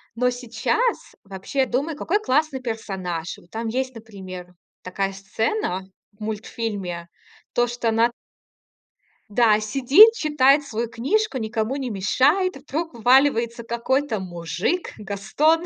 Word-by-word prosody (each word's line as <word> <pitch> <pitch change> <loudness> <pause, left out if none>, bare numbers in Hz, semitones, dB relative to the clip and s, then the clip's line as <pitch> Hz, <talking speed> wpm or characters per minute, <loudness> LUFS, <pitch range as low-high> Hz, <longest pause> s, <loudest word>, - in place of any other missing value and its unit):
Но 250 +2 +2
сейчас 250 - -1
вообще 200 +8 -2
думаю, 285 +5 -1
какой 390 +7 0
классный 295 -6 0
персонаж. 190 -8 -4
Вот 175 - -19
там 225 +1 -4
есть, 255 +3 -2
например, 185 -5 -9 0.3
такая 195 +1 -2
сцена 195 - -2 0.3
в 205 - -32
мультфильме. 205 -5 -4 0.5
То, 240 0 +2
что 240 -1 -1
она 225 +2 +3 1.2
Да, 215 -1 +4
сидит, 270 - +7
читает 295 - +3
свою 235 -3 -3
книжку, 275 - 0
никому 220 +2 -2
не 265 -3 -3
мешает. 280 - +2
И - - -12
вдруг 315 +3 -4
вваливается 235 -1 +3
какой-то 235 +1 -1
мужик, 175 - -2
Гастон. 215 - +1
235 Hz, 125 wpm, -23 LUFS, 205-275 Hz, 1.2 s, сидит